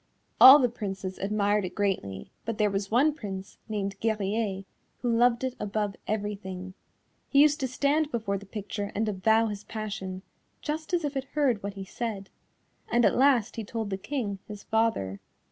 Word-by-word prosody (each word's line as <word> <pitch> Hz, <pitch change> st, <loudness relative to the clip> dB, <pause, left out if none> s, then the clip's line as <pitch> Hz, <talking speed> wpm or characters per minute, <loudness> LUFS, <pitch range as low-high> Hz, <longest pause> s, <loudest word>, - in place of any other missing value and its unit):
All 265 Hz, +2 st, +12 dB
the 260 Hz, -4 st, +3 dB
Princes 195 Hz, -5 st, -5 dB
admired 205 Hz, +1 st, +1 dB
it 180 Hz, -1 st, -5 dB
greatly, 185 Hz, -, -2 dB
but 230 Hz, -2 st, -3 dB
there 210 Hz, -2 st, +2 dB
was 195 Hz, 0 st, -2 dB
one 275 Hz, +7 st, +4 dB
Prince, 195 Hz, -8 st, -7 dB
named 200 Hz, -2 st, -3 dB
Guerrier, 210 Hz, -2 st, -1 dB, 0.4 s
who 240 Hz, -2 st, +2 dB
loved 240 Hz, +1 st, +3 dB
it 260 Hz, -1 st, -1 dB
above 210 Hz, -1 st, -2 dB
everything; 200 Hz, -3 st, -4 dB, 0.6 s
he 275 Hz, -, +4 dB
used 300 Hz, +1 st, +3 dB
to 265 Hz, -, 0 dB
stand 285 Hz, +4 st, +1 dB
before 220 Hz, -7 st, -2 dB
the 200 Hz, -, -14 dB
picture 205 Hz, 0 st, -5 dB
and 220 Hz, +2 st, 0 dB
avow 220 Hz, +3 st, +3 dB
his 210 Hz, -2 st, -4 dB
passion, 200 Hz, -4 st, -5 dB, 0.4 s
just 310 Hz, +1 st, -4 dB
as 345 Hz, -3 st, +1 dB
if 290 Hz, -1 st, -3 dB
it 270 Hz, -1 st, -2 dB
heard 265 Hz, -8 st, +2 dB
what 200 Hz, 0 st, -5 dB
he 195 Hz, -1 st, -6 dB
said, 205 Hz, -2 st, -5 dB, 0.6 s
and 240 Hz, -1 st, +4 dB
at -, -, +3 dB
last 250 Hz, -4 st, +3 dB
he 225 Hz, -, -2 dB
told 220 Hz, -1 st, -4 dB
the -, -, 0 dB
King, 205 Hz, -2 st, -3 dB
his 210 Hz, -1 st, -8 dB
father. 220 Hz, -, 0 dB
210 Hz, 180 wpm, -28 LUFS, 195-240 Hz, 0.6 s, All